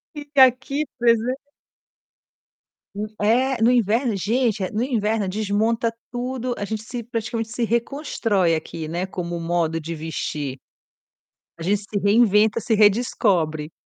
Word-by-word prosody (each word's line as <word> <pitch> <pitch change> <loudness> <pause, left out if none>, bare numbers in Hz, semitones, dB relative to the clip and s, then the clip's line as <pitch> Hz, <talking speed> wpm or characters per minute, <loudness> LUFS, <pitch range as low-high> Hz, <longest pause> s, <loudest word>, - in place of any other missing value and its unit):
E 295 - -5 0.2
aqui 265 +3 +4
pois 235 -2 +4
é. 255 +4 -4 1.5
Hum. 210 +1 -3
É, 245 +4 +2
no 230 +2 +5
inverno 235 0 +2
gente, 220 +1 0
no 220 +3 -1
inverno 220 -5 0
desmonta 220 +3 0 0.2
tudo, 250 0 -3
a 205 - -3
gente 220 +1 -4
se 240 +2 -6
praticamente 225 -1 -3
se 240 +1 -3
reconstrói 230 - 0
aqui, 160 0 -5
né, 170 +3 -2
com 190 -1 -5
o 170 0 -4
modo 165 -1 0
de 165 +1 -5
vestir. 150 -3 -4 1.0
A 165 - -8
gente 200 +4 +2
se 205 - -1
reinventa, 210 +1 +4
se 225 0 0
redescobre. 185 -8 +2
220 Hz, 140 wpm, -22 LUFS, 185-240 Hz, 1.5 s, no